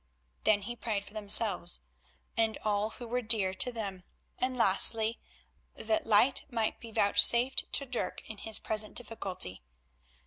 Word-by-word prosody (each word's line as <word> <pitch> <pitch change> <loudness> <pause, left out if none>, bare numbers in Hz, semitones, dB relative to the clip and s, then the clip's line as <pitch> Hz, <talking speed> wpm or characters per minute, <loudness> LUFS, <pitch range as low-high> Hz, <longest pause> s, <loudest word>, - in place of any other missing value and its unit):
Then 205 -2 +2
he 240 +4 -6
prayed 210 -4 -4
for - - -15
themselves 205 -4 +4 0.5
and 225 -1 0
all 210 0 -1
who 240 +1 -11
were 245 +2 -3
dear 215 -5 +2
to 250 +6 +2
them, 200 -6 -7 0.4
and 255 0 -2
lastly, 220 +2 +3 0.6
that 220 0 -3
light 230 +5 +3
might 225 -4 -3
be 230 - -11
vouchsafed 235 +5 +3
to 280 - +4
Dirk 250 -2 -5
in 220 - -10
his 220 -1 +1
present 215 -1 -4
difficulty. 195 - -4
220 Hz, 145 wpm, -29 LUFS, 205-235 Hz, 0.6 s, themselves